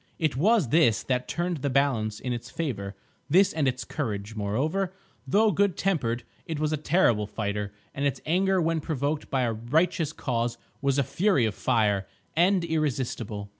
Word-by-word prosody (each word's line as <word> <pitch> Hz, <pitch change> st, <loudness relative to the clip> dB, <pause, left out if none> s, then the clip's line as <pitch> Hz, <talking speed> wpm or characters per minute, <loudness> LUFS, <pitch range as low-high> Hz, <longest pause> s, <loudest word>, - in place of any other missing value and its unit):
It 155 Hz, -5 st, 0 dB
was 190 Hz, -, +3 dB
this 120 Hz, -8 st, +4 dB
that 125 Hz, -1 st, -1 dB
turned 175 Hz, 0 st, -1 dB
the 140 Hz, 0 st, -2 dB
balance 125 Hz, -6 st, +1 dB
in 125 Hz, -2 st, -3 dB
its 120 Hz, 0 st, -6 dB
favour, 100 Hz, -11 st, -4 dB, 0.3 s
this 190 Hz, +6 st, +5 dB
and 155 Hz, -3 st, +1 dB
its 130 Hz, +1 st, -1 dB
courage. 110 Hz, -7 st, -4 dB
Moreover, 145 Hz, -, -1 dB, 0.4 s
though 210 Hz, +9 st, +4 dB
good 200 Hz, +1 st, +1 dB
tempered, 125 Hz, -11 st, 0 dB, 0.2 s
it 160 Hz, -3 st, -3 dB
was 155 Hz, 0 st, 0 dB
a -, -, +3 dB
terrible 140 Hz, -, +2 dB
fighter, 105 Hz, -1 st, -3 dB, 0.2 s
and 140 Hz, -, -3 dB
its 140 Hz, -1 st, 0 dB
anger 190 Hz, +4 st, +2 dB
when 165 Hz, -1 st, +1 dB
provoked 145 Hz, 0 st, -2 dB
by 130 Hz, -2 st, +1 dB
a 115 Hz, -2 st, 0 dB
righteous 155 Hz, +8 st, +1 dB
cause 120 Hz, -6 st, -2 dB, 0.2 s
was 140 Hz, 0 st, +1 dB
a 140 Hz, -, +3 dB
fury 180 Hz, -, +2 dB
of 110 Hz, -, -1 dB
fire, 105 Hz, -4 st, +1 dB, 0.3 s
and 180 Hz, +2 st, +3 dB
irresistible. 125 Hz, -10 st, -2 dB
140 Hz, 170 wpm, -27 LUFS, 115-165 Hz, 0.4 s, this